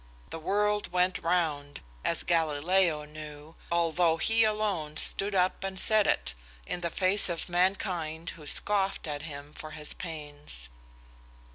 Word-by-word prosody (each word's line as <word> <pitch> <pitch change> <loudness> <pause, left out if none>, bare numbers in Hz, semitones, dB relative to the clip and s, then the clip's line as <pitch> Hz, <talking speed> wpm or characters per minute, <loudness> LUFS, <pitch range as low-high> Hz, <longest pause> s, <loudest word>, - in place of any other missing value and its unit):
The 165 - -5
world 210 +4 0
went 180 +1 +1
round, 155 -4 -1 0.2
as - - 0
Galileo 165 0 +2
knew, 150 +1 -10 0.2
although 170 0 +2
he 225 +5 +3
alone 205 -8 -1
stood 200 0 +5
up 185 +1 +1
and 190 -1 -3
said 215 0 +3
it - - +1 0.3
in 175 - -4
the 170 - -1
face 190 +3 +4
of 170 -1 -3
mankind, 175 -3 -1
who 150 -2 -12
scoffed 195 +4 +1
at 145 -2 -4
him 145 -2 -8
for 155 - -9
his 150 0 -3
pains." 145 - -5
170 Hz, 140 wpm, -29 LUFS, 150-190 Hz, 0.3 s, stood